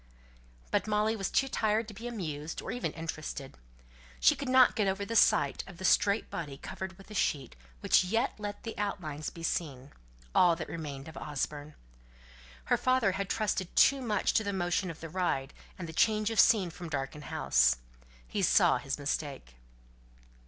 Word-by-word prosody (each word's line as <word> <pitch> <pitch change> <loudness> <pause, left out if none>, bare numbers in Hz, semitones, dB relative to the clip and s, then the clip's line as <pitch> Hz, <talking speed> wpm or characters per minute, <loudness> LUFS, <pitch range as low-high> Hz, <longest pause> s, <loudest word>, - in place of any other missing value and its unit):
But - - +1
Molly 215 +1 +1
was 195 -3 -2
too 270 - +2
tired 220 -3 0
to 215 - -9
be 225 +4 -7
amused, 160 -9 -5
or - - -5
even 245 +1 -2
interested. 155 -4 -6 0.6
She - - +5
could 275 - -5
not 255 -1 +6
get 210 -3 +1
over 195 +1 -1
the 230 - -4
sight 215 -1 +4
of 190 -3 -11
the 185 - -5
straight 200 +3 +3
body 145 -5 -5
covered 190 +4 -7
with 195 +2 -15
a - - -6
sheet, 145 -9 -1 0.3
which - - +4
yet 225 +8 0
let 205 -1 -6
the 225 - -5
outlines 155 -7 -3
be 165 - -11
seen, 140 -5 -3 0.4
all 175 -2 +5
that 165 - -6
remained 145 -4 -6
of 160 - -10
Osborne. 150 0 -4 0.9
Her - - +2
father 255 -6 +2
had 195 0 -3
trusted 195 -4 -1
too 275 -1 +5
much 220 -4 0
to 220 - +3
the 200 - -2
motion 180 0 0
of 165 - -8
the 165 - -5
ride, 155 -6 -1 0.2
and 180 - -6
the 160 - -8
change 215 +6 +2
of 225 - 0
scene 195 -6 +5
from 175 0 -8
the 160 - -9
darkened 135 +1 -4
house. - - +3 0.5
He - - -2
saw - - +4
his - - -3
mistake. - - -4
185 Hz, 185 wpm, -30 LUFS, 155-215 Hz, 0.9 s, not